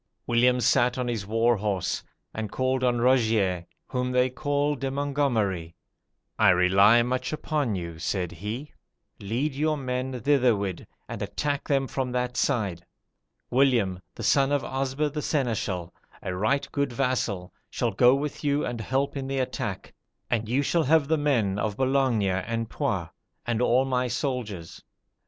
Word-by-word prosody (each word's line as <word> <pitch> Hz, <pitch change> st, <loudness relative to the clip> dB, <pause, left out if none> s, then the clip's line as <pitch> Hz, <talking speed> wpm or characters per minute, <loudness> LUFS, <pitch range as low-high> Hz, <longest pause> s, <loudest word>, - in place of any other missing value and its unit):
"William 125 Hz, +1 st, +3 dB
sat 125 Hz, +1 st, +3 dB
on 125 Hz, -1 st, -1 dB
his 110 Hz, -5 st, -3 dB
war 115 Hz, +2 st, +2 dB
horse, 100 Hz, -3 st, -1 dB, 0.3 s
and 110 Hz, -2 st, -4 dB
called 130 Hz, 0 st, 0 dB
on 120 Hz, -1 st, +2 dB
Rogier, 110 Hz, -8 st, +2 dB, 0.2 s
whom 125 Hz, 0 st, -1 dB
they 125 Hz, 0 st, +3 dB
call 145 Hz, +2 st, 0 dB
De 135 Hz, -1 st, -3 dB
Mongomeri. 125 Hz, -, -1 dB, 0.6 s
'I -, -, +6 dB
rely 95 Hz, +6 st, +5 dB
much 125 Hz, +1 st, -2 dB
upon 150 Hz, -7 st, -1 dB
you,' 85 Hz, -3 st, -6 dB
said 90 Hz, +1 st, -2 dB
he: 105 Hz, -, -6 dB, 0.5 s
'lead 120 Hz, +9 st, -2 dB
your 155 Hz, +2 st, 0 dB
men 130 Hz, -1 st, -3 dB
thitherward, 120 Hz, -9 st, +1 dB, 0.2 s
and -, -, -6 dB
attack 140 Hz, +8 st, -2 dB
them 135 Hz, -2 st, +2 dB
from 130 Hz, -1 st, -3 dB
that 125 Hz, 0 st, -1 dB
side. 100 Hz, -, 0 dB, 0.7 s
William, 120 Hz, -8 st, +3 dB, 0.2 s
the -, -, -7 dB
son 140 Hz, 0 st, +3 dB
of 145 Hz, -1 st, +1 dB
Osber 135 Hz, +2 st, -1 dB
the 150 Hz, -, -2 dB
seneschal, 110 Hz, -, -1 dB, 0.3 s
a 95 Hz, -, -3 dB
right 110 Hz, +9 st, +1 dB
good 140 Hz, -2 st, 0 dB
vassal, 120 Hz, -8 st, -1 dB, 0.2 s
shall 120 Hz, -, -1 dB
go 120 Hz, +6 st, +5 dB
with 145 Hz, +2 st, -4 dB
you 145 Hz, 0 st, +1 dB
and 120 Hz, -2 st, -4 dB
help 135 Hz, +6 st, -1 dB
in 135 Hz, -1 st, -4 dB
the 135 Hz, 0 st, -2 dB
attack, 130 Hz, -1 st, -3 dB, 0.4 s
and 110 Hz, -2 st, 0 dB
you 135 Hz, +4 st, +2 dB
shall 165 Hz, +3 st, +1 dB
have 155 Hz, 0 st, +3 dB
the 160 Hz, -, +4 dB
men 115 Hz, -10 st, +1 dB
of 105 Hz, -1 st, -2 dB
Boulogne 130 Hz, -4 st, +2 dB
and 105 Hz, +4 st, -1 dB
Poix, -, -, -1 dB, 0.4 s
and 120 Hz, -1 st, 0 dB
all 125 Hz, +2 st, +3 dB
my 125 Hz, -1 st, 0 dB
soldiers. 120 Hz, -, -4 dB
125 Hz, 155 wpm, -26 LUFS, 105-135 Hz, 0.7 s, I